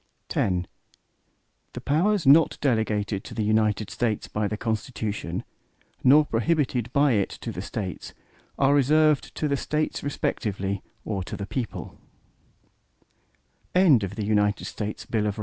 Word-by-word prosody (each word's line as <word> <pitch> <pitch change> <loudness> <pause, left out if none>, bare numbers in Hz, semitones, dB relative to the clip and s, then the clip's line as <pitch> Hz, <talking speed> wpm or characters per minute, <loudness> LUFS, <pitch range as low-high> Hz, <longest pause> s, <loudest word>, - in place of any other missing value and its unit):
X 90 -2 +1 1.1
The - - -6
powers 175 +5 +1
not 150 +4 +6
delegated 110 -6 0
to 115 - -9
the 110 - -1
United 110 -1 +1
States 115 -3 -1
by 105 0 -1
the 105 - -3
Constitution, 110 -1 -3 0.6
nor 145 +4 +6
prohibited 125 -2 0
by 140 +1 +3
it 100 -5 +1
to - - -6
the - - -5
States, 95 -4 -6 0.4
are 140 0 +4
reserved 150 +2 +3
to 155 - -1
the 140 -1 0
States 155 +3 -2
respectively, 100 -8 -2 0.2
or 100 -3 -2
to - - -6
the 100 - -4
people. 120 +2 -5
115 Hz, 115 wpm, -25 LUFS, 105-145 Hz, 1.1 s, not